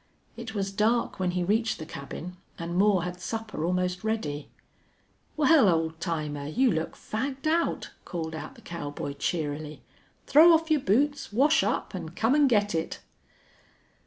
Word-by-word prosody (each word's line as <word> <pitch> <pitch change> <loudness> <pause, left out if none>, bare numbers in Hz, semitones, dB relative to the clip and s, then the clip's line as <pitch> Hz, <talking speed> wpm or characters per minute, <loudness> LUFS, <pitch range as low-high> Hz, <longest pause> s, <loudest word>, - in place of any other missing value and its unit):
It 235 -1 -7
was 195 -1 -1
dark 220 +3 +1
when 185 -1 +1
he 180 - +1
reached 220 +5 +1
the 155 - -7
cabin, 165 +4 -7 0.2
and 170 0 -4
Moore 195 -2 +3
had 180 0 -5
supper 220 -3 -4
almost 180 +2 -1
ready. 155 -10 -2 0.9
"Well, 300 -7 +6
old 160 -1 0
timer, 150 -5 -3
you 245 - +2
look 160 -2 -2
fagged 265 +5 -4
out," 330 +2 0
called 160 -2 -5
out 160 +12 -7
the 235 - -16
cowboy, 145 -6 -5
cheerily. 150 0 -3 0.4
"Throw 325 +4 +7
off 325 0 +2
your 305 -3 +3
boots, 280 +7 +1
wash 285 +8 +4
up, - - -1
and - - -6
come 225 +4 +2
and 290 -2 +5
get 205 -3 +2
it!" 165 0 -2
195 Hz, 160 wpm, -27 LUFS, 165-245 Hz, 0.9 s, Throw